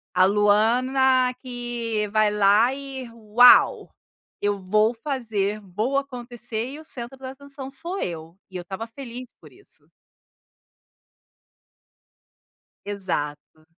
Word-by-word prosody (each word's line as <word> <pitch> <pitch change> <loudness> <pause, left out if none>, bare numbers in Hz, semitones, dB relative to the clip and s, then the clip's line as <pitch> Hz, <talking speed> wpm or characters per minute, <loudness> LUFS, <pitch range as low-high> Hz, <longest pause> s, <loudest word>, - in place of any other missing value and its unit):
A 185 - +6
Luana, 250 +6 +3
que 240 -4 -3
vai 215 0 +3
lá 210 +5 +4
e: 270 -2 -7
"Uau. 230 +2 +5 0.5
Eu 205 0 0
vou 215 +5 +2
fazer, 225 -6 -2
vou 210 +8 -2
acontecer 240 -4 -4
e 295 - -8
o - - -11
centro 250 -2 -7
da 260 -1 -7
atenção 275 0 -9
sou 340 +8 -5
eu". 165 -1 -5 0.2
E 185 - -5
eu - - -5
estava 190 +5 -6
feliz 250 0 -9
por - - -16
isso. - - -16 3.0
Exato. 155 -6 -5
230 Hz, 115 wpm, -24 LUFS, 205-260 Hz, 3.0 s, A